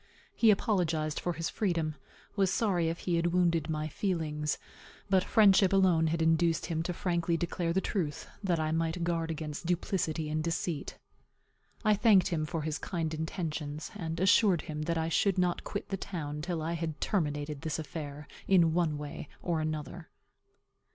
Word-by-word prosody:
He 230 - +4
apologized 170 -7 +1
for 175 - -1
his 165 0 -3
freedom; 170 -7 0 0.4
was 195 -3 +2
sorry 190 -8 +1
if 165 - -4
he 175 -2 0
had 170 +1 +1
wounded 170 -2 +2
my 155 -1 -1
feelings; 155 -4 -1 0.5
but 190 -1 +5
friendship 195 -3 +5
alone 185 -4 +4
had 165 +1 0
induced 165 0 +2
him 165 -2 -1
frankly 170 -1 0
to 175 - 0
declare 170 -1 -2
the 190 +3 +1
truth, 160 -9 -2 0.2
that 175 -4 +1
I 155 0 0
might 165 +2 0
guard 165 -1 -1
against 155 0 -5
duplicity 170 -3 -1
and 155 +1 -1
deceit. 165 -2 -3 0.9
I 215 - +6
thanked 205 -3 +5
him 155 -4 -1
for 165 -2 -3
his 155 0 -2
kind 165 -3 -3
intensions; 155 -2 -4
and 165 -1 -4
assured 190 -1 +4
him 155 -1 -5
that 165 +2 -1
I 160 0 0
should 190 +4 +2
not 180 -1 +1
quit 205 - -5
the 195 - -2
town 150 -6 -5
till 170 -1 -3
I 165 +2 -1
had 165 -2 -3
terminated 150 -5 -1
this 160 -1 -2
affair, 150 -2 -6 0.2
in 170 -4 +5
one 165 -3 +1
way 145 0 -7
or 165 -3 -1
another. 155 +2 -4
165 Hz, 170 wpm, -31 LUFS, 155-180 Hz, 0.9 s, I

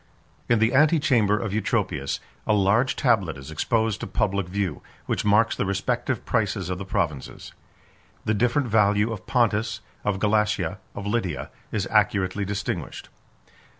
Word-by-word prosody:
In 120 - +5
the 110 +3 +2
antechamber 135 -8 +4
of 105 -2 -3
Eutropius, 90 -10 -1 0.3
a - - +4
large 105 +6 +3
tablet 100 - +1
is 70 +3 -9
exposed 110 +6 0
to - - -5
public 100 -4 0
view, 95 -4 -2 0.2
which - - -1
marks 105 +2 +3
the - - -1
respective 95 0 -1
prices 95 -2 0
of 90 - -3
the 100 - -5
provinces. 75 -7 -3 0.7
The 110 - +2
different 125 +5 +1
value 105 0 +3
of 105 - -9
Pontus, 115 -3 +1 0.2
of 105 -2 0
Galatia, 105 +1 +1 0.2
of 100 - -6
Lydia, 95 - -2 0.2
is 105 -4 -1
accurately 100 -2 +2
distinguished. 100 -1 -4
105 Hz, 145 wpm, -25 LUFS, 95-115 Hz, 0.7 s, In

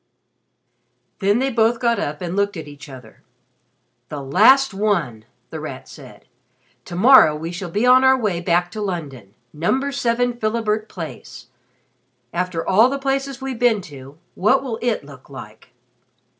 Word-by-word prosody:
Then 200 +2 +2
they 265 +2 0
both 230 0 +2
got 235 -2 +1
up 150 +3 -4
and 175 +1 -4
looked 200 -1 0
at 160 -2 -7
each 145 0 -12
other. 125 -5 -13 0.9
"The 150 - -6
last 215 - +4
one!" 170 - -1 0.3
The - - -6
Rat - - -8
said. - - -14 0.6
"To 175 - -8
morrow 200 - +6
we 160 +2 -5
shall 180 +1 -6
be 210 +8 0
on 255 +1 +6
our 265 0 +5
way 200 -8 -2
back 175 0 0
to 215 - -6
London 140 - -6 0.2
Number 260 - -1
7 245 -2 -1
Philibert 215 -1 -1
Place. 160 - -9 0.8
After 175 -1 -2
all 220 +6 +5
the 275 - -2
places 270 -1 -3
we've 265 -3 -5
been 235 -4 +2
to 135 +2 -12 0.2
what 215 +9 +2
will 235 -4 -5
it 235 -10 -1
look 140 -2 -15
like?" 110 -4 -12
200 Hz, 155 wpm, -20 LUFS, 155-245 Hz, 0.9 s, morrow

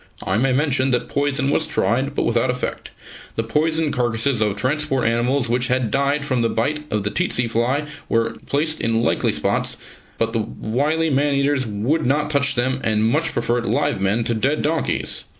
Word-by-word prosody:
(I 95 - -1
may 130 +3 +2
mention 135 -1 +1
that 125 -2 0
poison 140 -1 0
was 160 - +1
tried, 135 +4 0
but - - +1
without 115 +1 +1
effect. 125 0 -3 0.5
The 115 - 0
poisoned 155 +5 0
carcases 120 0 +1
of 105 -2 +1
transport 135 +2 0
animals 120 +3 +1
which 120 +1 0
had 125 -4 0
died 140 +2 +1
from 130 -4 0
the 115 - +1
bite 150 +7 -2
of 105 -1 0
the 105 - -2
tsetse 165 -8 0
fly 120 +6 0 0.2
were 115 0 +1 0.2
placed 155 +2 0
in 115 0 +1
likely - - +1
spots, - - 0 0.4
but 115 0 -1
the 115 - +1
wily 145 +9 -1
man 140 +1 +2
eaters 140 -2 +1
would 115 +10 0
not 150 +3 +1
touch 140 -1 +2
them, 130 +2 0
and 110 0 +2
much 160 +4 +1
preferred 120 -1 -1
live - - 0
men 100 +4 +1
to 120 0 0
dead 135 +7 0
donkeys.) 160 +2 -1
130 Hz, 185 wpm, -21 LUFS, 115-145 Hz, 0.5 s, may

